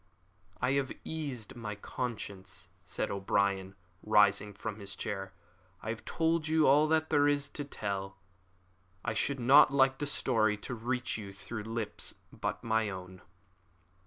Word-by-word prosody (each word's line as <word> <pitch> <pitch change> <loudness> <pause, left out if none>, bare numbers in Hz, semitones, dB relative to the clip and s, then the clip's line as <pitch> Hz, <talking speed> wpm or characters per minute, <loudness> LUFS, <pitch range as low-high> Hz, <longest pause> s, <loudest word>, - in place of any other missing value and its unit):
"I 125 - +1
have 140 -1 +1
eased 140 -9 -4
my 110 -3 -5
conscience," 100 -3 -5
said - - -3
O'Brien, 100 -1 0 0.3
rising 105 -1 +4
from 105 +1 -6
his 100 -1 -7
chair; 95 -1 -4 0.5
"I 110 - -4
have 110 0 -4
told 165 -1 +1
you 160 -1 +4
all 145 +3 +6
that 160 0 +1
there 145 -1 +5
is 145 -1 +2
to 145 - -4
tell. 100 -7 -4 0.9
I 115 - 0
should 135 +5 0
not 130 +3 +7
like 135 -1 +4
the 145 - -1
story 110 -7 +2
to 115 - -6
reach 120 0 -2
you 100 -2 -7
through 110 +3 -6
any - - -7
lips 115 -3 -3 0.2
but - - -3
my 110 -1 +1
own." 95 -1 -8
110 Hz, 155 wpm, -32 LUFS, 100-140 Hz, 0.9 s, not